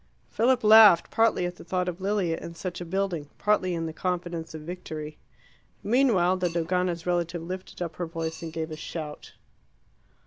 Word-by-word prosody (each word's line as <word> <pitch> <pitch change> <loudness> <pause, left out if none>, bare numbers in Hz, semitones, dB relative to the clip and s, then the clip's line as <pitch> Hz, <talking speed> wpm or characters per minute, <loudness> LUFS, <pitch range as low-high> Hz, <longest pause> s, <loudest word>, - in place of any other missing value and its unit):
Philip 250 +2 +2
laughed, 215 -4 +8
partly 225 -5 +2
at 175 0 -5
the - - -11
thought 180 +1 -1
of 180 +1 -4
Lilia 195 -4 0
in 170 - -8
such 180 +1 -5
a - - -4
building, 175 -4 -2
partly 195 -4 +1
in 165 -1 -2
the 160 - -5
confidence 175 -2 -3
of 155 - -8
victory. 155 -3 -7 0.6
Meanwhile 210 -7 +3
the 180 -1 0
Dogana's 170 +1 -1
relative 175 -1 -1
lifted 185 +1 -6
up 165 -2 -6
her 175 - -3
voice 165 -1 -5
and 165 -1 -6
gave 160 0 -4
a - - -4
shout. 155 -1 -7
175 Hz, 175 wpm, -27 LUFS, 165-185 Hz, 0.6 s, laughed